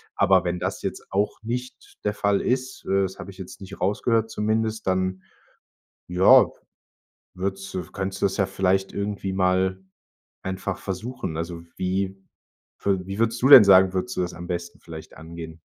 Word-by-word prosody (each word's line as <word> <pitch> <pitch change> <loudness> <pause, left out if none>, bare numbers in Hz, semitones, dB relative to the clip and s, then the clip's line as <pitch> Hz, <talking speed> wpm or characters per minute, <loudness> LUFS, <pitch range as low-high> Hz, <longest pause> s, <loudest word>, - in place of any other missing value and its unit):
Aber 95 -2 +4
wenn 90 0 -2
das - - -3
jetzt - - -4
auch 100 +2 -1
nicht 125 +3 -6
der 105 - 0
Fall 100 -1 +1
ist, 130 +1 -2
äh, 95 0 +2
das 95 0 -4
habe 100 - -8
ich 95 - -17
jetzt 95 +1 -9
nicht 95 0 -10
rausgehört 110 +4 +1
zumindest, 110 0 -1
dann, 95 0 0 0.9
ja, 90 +2 +7 0.9
würdest 95 +1 -4
du 90 - -2
könntest 95 0 -4
du - - +6
das 95 - -1
ja 95 -3 +2
vielleicht 95 0 0
irgendwie 100 -1 -3
mal 95 0 +1 0.6
einfach 95 0 -4
versuchen. 95 -3 -5
Also, 85 +1 -5
wie 95 +1 -1 0.7
wü 95 -2 +2
wie 95 +1 -5
würdest 115 +1 +1
du 130 - +5
denn 130 -6 +11
sagen 95 -1 +6
würdest 95 +7 -2
du - - 0
das 90 - -4
am 85 - -8
besten 85 -1 -4
vielleicht 80 -2 -11
angehen? 80 0 -9
95 Hz, 170 wpm, -24 LUFS, 90-105 Hz, 0.9 s, denn